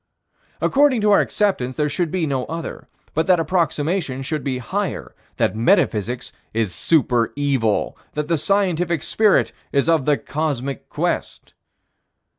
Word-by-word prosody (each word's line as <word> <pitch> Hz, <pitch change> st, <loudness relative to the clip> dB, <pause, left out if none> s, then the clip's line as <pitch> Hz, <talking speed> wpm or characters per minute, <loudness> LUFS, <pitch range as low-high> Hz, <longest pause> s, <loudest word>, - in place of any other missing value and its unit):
According 275 Hz, -4 st, +3 dB
to 210 Hz, 0 st, +3 dB
our 200 Hz, -, +6 dB
acceptance, 130 Hz, -12 st, 0 dB
there 150 Hz, -1 st, +1 dB
should 165 Hz, +3 st, -1 dB
be 180 Hz, 0 st, -1 dB
no 135 Hz, -4 st, -1 dB
other, 165 Hz, 0 st, -6 dB, 0.3 s
but 160 Hz, +1 st, 0 dB
that 180 Hz, -2 st, +5 dB
approximation 160 Hz, -3 st, 0 dB
should 155 Hz, +2 st, -3 dB
be 130 Hz, -2 st, -1 dB
higher: 185 Hz, +8 st, -3 dB, 0.2 s
that -, -, 0 dB
metaphysics 115 Hz, +1 st, +1 dB, 0.2 s
is 110 Hz, -5 st, 0 dB
super 125 Hz, -, +2 dB
evil: 135 Hz, -7 st, 0 dB, 0.2 s
that 150 Hz, 0 st, -2 dB
the 165 Hz, -2 st, +1 dB
scientific 175 Hz, -4 st, +1 dB
spirit 215 Hz, -2 st, +3 dB, 0.2 s
is 140 Hz, +2 st, +1 dB
of 165 Hz, -5 st, +3 dB
the 150 Hz, -1 st, +3 dB
cosmic 140 Hz, -3 st, -3 dB
quest. -, -, -3 dB
150 Hz, 140 wpm, -21 LUFS, 130-180 Hz, 0.3 s, our